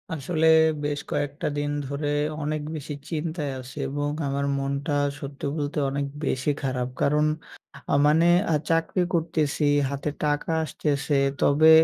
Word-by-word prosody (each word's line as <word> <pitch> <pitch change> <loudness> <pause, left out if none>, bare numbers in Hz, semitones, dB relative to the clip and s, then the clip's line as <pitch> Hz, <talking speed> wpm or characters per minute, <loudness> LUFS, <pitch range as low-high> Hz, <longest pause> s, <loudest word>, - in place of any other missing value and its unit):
আসলে 160 +2 +1 0.4
বেশ 145 0 -1
কয়েকটা 145 0 -2
দিন 145 0 -1 0.2
ধরে 145 +2 -3 0.4
অনেক 155 +1 -1
বেশি 150 0 -5 0.2
চিন্তায় 155 -2 -2
আছি 130 +3 -10
এবং 145 +1 -1 0.2
আমার 140 +1 -1
মনটা 140 +2 -2 0.3
সত্যি 140 0 -6
বলতে 150 0 -3
অনেক 140 +1 -1 0.2
বেশি 135 +2 0
খারাপ। 130 -2 -1
কারণ 150 +1 +3 0.7
আ - - +3
মানে 155 +3 +5 0.3
আ - - +4
চাকরি 165 +3 +1
করতেছি, 160 -3 0 0.3
হাতে 140 +1 -2 0.2
টাকা 145 +1 0
আসতেছে। 145 -2 -1 0.3
তবে 155 +3 +5
145 Hz, 135 wpm, -25 LUFS, 140-155 Hz, 0.7 s, মানে